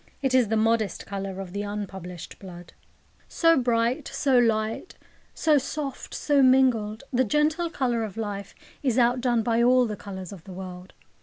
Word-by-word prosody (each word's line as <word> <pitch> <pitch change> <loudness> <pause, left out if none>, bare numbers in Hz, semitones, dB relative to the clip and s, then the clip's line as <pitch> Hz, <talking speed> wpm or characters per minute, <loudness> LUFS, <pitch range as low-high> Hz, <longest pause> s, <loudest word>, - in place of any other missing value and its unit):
It 265 -1 +1
is 255 -3 +4
the 220 +1 0
modest 220 -1 +1
colour 195 -1 -5
of 185 -2 -7
the 200 - -2
unpublished 190 -4 -7
blood. 175 -3 -11 0.5
So 330 -1 +3
bright, 240 +2 +1
so 270 -3 +1
light, 225 +5 0 0.4
so 305 -3 +3
soft, 280 0 -5
so 290 -2 +2
mingled, 255 -4 +3
the 255 +1 +3
gentle 305 - +1
colour 245 -7 -1
of 215 -1 -6
life 205 -3 -5 0.3
is 255 -4 0
outdone 245 -1 +2
by 230 +1 +1
all 250 +1 +5
the 215 -2 -3
colours 190 -3 -8
of 190 -5 -11
the 190 - -9
world. 180 0 -9
230 Hz, 165 wpm, -26 LUFS, 200-260 Hz, 0.5 s, all